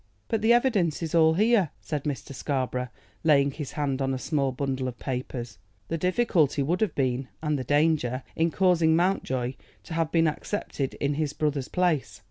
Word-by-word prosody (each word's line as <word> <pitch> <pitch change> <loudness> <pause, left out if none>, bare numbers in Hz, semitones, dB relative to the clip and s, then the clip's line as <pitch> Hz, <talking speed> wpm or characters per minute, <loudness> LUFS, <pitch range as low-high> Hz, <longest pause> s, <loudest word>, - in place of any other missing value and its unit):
"But 225 - 0
the 220 +2 +4
evidence 215 - +2
is 160 - -4
all 160 -1 +5
here," 210 -3 +3
said 150 -2 -4
Mr. 140 -3 -4
Scarborough, 130 -2 -2 0.4
laying 140 -3 +4
his 145 -1 -6
hand 140 -2 -1
on 135 0 0
a - - -2
small 140 0 0
bundle 130 0 -2
of 125 -2 -6
papers. 125 -4 -5 0.3
"The 165 - -1
difficulty 180 - +2
would 170 +8 0
have 215 - 0
been, 130 -1 0 0.2
and 150 -2 0
the - - -3
danger, 145 -4 +1
in 165 +1 +2
causing 170 -2 +3
Mountjoy 130 -8 0 0.3
to 165 - -8
have 165 -1 0
been 165 -1 +3
accepted 150 -4 -3
in 145 +1 -1
his 150 -1 -1
brother's 145 -4 -1
place. 165 - 0
150 Hz, 180 wpm, -27 LUFS, 135-165 Hz, 0.4 s, all